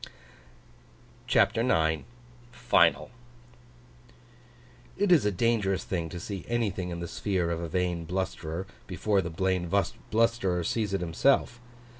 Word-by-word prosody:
CHAPTER 105 +3 +3
IX 80 -10 +1 0.5
FINAL 120 - +2 1.9
IT 200 -1 +2
is 160 -10 +5
a - - +2
dangerous 100 -1 +1
thing 85 -3 -3
to 90 - -6
see 95 0 -6
anything 100 -6 -1
in 85 -1 -5
the 85 - -4
sphere 90 -2 -1
of 85 0 -2
a 85 - -4
vain 90 -1 -1
blusterer, 90 -1 -3 0.2
before 100 +2 +1
the 85 - -4
vain 90 +1 -1 0.4
blusterer 110 -6 +1
sees 105 +2 -1
it 95 - -2
himself. 120 +7 +1
95 Hz, 125 wpm, -28 LUFS, 85-110 Hz, 1.9 s, is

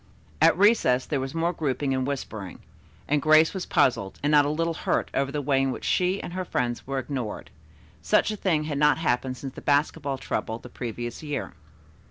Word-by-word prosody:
At 165 +1 +5
recess 190 - +4
there 145 - -1
was 135 +3 -5
more 170 +2 0
grouping 140 -3 -1
and 130 0 -1
whispering, 110 -9 -5 0.5
and 150 0 +1
Grace 155 +1 +5
was 190 -2 -4
puzzled 100 -6 +1
and 145 - +2
not 145 -1 +6
a - - 0
little 165 +2 0
hurt - - -1
over 140 0 0
the 145 0 -3
way 135 -1 +2
in 135 - +1
which 130 - -5
she 185 +2 +1
and 175 - -7
her 185 0 -2
friends 120 -9 -2
were 135 0 -2
ignored. 130 -4 -4 0.5
Such - - +2
a - - -3
thing 170 -7 0
had 150 -2 -3
not 150 0 +4
happened 130 -4 -1
since 135 +1 -7
the - - -10
basketball 140 -1 0
trouble 110 -3 -3
the 125 - -12
previous 120 -1 -6
year. 150 -2 -4
140 Hz, 205 wpm, -26 LUFS, 130-160 Hz, 0.5 s, not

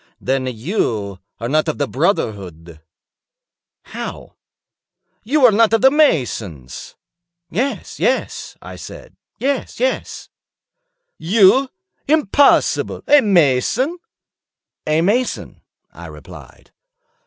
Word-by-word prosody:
"Then 130 0 -1
you 110 - -3 0.2
are 115 - -4
not 155 +5 +1
of 155 - -2
the 145 - -1
brotherhood." 95 - -3 1.0
"How?" - - -8 0.9
"You 270 +5 +3
are 240 - +7
not 225 +1 +3
of 225 - +3
the 265 +1 +6
masons." 115 - -1 0.6
"Yes, 255 +10 -3
yes," - - -2
I - - -9
said, - - -11 0.2
"yes, 275 +1 -3
yes." - - -3 0.9
"You? 205 +9 +4 0.4
Impossible! 290 -1 +2
A 290 0 +6
mason?" 200 - +1 0.9
"A 155 +1 +2
mason," 230 +8 -1 0.3
I - - -10
replied. - - -14
175 Hz, 95 wpm, -18 LUFS, -, 1.0 s, are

